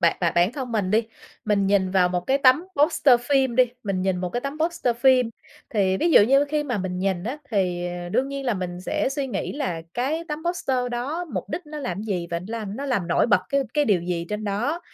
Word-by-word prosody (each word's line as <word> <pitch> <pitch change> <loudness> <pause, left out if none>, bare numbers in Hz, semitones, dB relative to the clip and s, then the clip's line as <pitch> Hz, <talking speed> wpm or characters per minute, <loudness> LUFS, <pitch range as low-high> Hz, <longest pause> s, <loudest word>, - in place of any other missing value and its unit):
bản 170 -1 +3
bản 170 - +1
bản 175 +6 +3
thân 260 -4 -5
mình 200 -4 0
đi, 220 +2 +3 0.4
mình 205 -2 +2
nhìn 195 -2 +2
vào 185 -2 +3
một 180 0 -1
cái 270 +1 +2
tấm 275 +5 +5
poster 285 -5 +4
phim 265 -2 +1
đi, 255 - +7 0.2
mình 195 -3 -2
nhìn 190 -1 +1
một 180 0 -2
cái 245 - -2
tấm 280 +3 -5
poster 315 -8 0
phim, 250 -1 +4 0.4
thì 190 -4 +1
ví 335 - +1
dụ - - +8
như 275 +6 +4
khi 295 +1 -1
mà 245 -7 -2
mình 180 -1 -3
nhìn 190 -1 -1
á, 265 +6 -4
thì, 180 -4 0 0.2
ờ, 175 - -6
đương 260 +9 0
nhiên 275 0 -5
là 240 - +1
mình 180 -1 -5
sẽ 300 +9 -1
suy 275 -1 -2
nghĩ 250 - -3
là 215 - -3
cái 300 +7 -1
tấm 300 0 -3
poster 310 -7 -1
đó 280 +9 -3
mục 320 - -4
đích 320 +2 -5
nó 300 0 -7
làm 195 -6 -4
gì? 185 -6 -2
Và 170 - -1
nó 180 - -11
làm 210 -1 -5
nó 280 - -4
làm 205 -10 -1
nổi 170 - +3
bật 205 -5 +4
cái 280 0 +2
cái 295 -1 +3
điều 195 -5 +2
gì 175 -1 -3
trên 210 +1 -4
đó? 235 - -1
235 Hz, 255 wpm, -24 LUFS, 185-275 Hz, 0.4 s, dụ